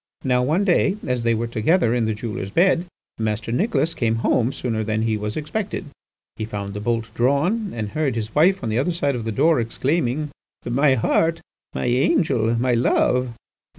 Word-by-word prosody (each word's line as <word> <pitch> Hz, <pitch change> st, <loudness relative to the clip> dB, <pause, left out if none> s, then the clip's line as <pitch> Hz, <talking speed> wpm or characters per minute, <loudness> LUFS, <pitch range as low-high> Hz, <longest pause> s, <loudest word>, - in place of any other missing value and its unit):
"Now 125 Hz, -2 st, +2 dB
one 155 Hz, +10 st, +1 dB
day, 195 Hz, +1 st, +2 dB
as 125 Hz, -1 st, -1 dB
they 115 Hz, 0 st, +2 dB
were 115 Hz, +2 st, -1 dB
together 120 Hz, -, +1 dB
in 120 Hz, -2 st, +1 dB
the 110 Hz, -1 st, -1 dB
jeweller's 105 Hz, -3 st, -5 dB
bed, 175 Hz, -, +2 dB, 0.3 s
Master 110 Hz, 0 st, -2 dB
Nicholas 165 Hz, -, +1 dB
came 115 Hz, -5 st, 0 dB
home 125 Hz, +1 st, +2 dB
sooner 115 Hz, -5 st, -2 dB
than 110 Hz, 0 st, -1 dB
he 110 Hz, -1 st, +1 dB
was 105 Hz, 0 st, -4 dB
expected. 190 Hz, +7 st, -3 dB, 0.5 s
He 110 Hz, -, -3 dB
found 100 Hz, -2 st, -5 dB
the 105 Hz, -, -5 dB
bolt 115 Hz, +1 st, -2 dB
drawn, 165 Hz, -, +1 dB
and 110 Hz, -3 st, -3 dB
heard 145 Hz, -1 st, -1 dB
his 110 Hz, -1 st, -4 dB
wife 175 Hz, +2 st, +3 dB
on 115 Hz, -, -2 dB
the 110 Hz, +2 st, 0 dB
other 170 Hz, +7 st, 0 dB
side 145 Hz, -4 st, 0 dB
of 120 Hz, -3 st, -4 dB
the 115 Hz, -, -2 dB
door 155 Hz, +8 st, +3 dB
exclaiming, 140 Hz, +4 st, -1 dB, 0.3 s
'My 135 Hz, +3 st, +3 dB
heart! 165 Hz, +7 st, +1 dB, 0.4 s
my -, -, -2 dB
angel! 120 Hz, -2 st, +2 dB
my 125 Hz, +2 st, +1 dB
love! 125 Hz, 0 st, +1 dB
125 Hz, 185 wpm, -22 LUFS, 110-155 Hz, 0.5 s, wife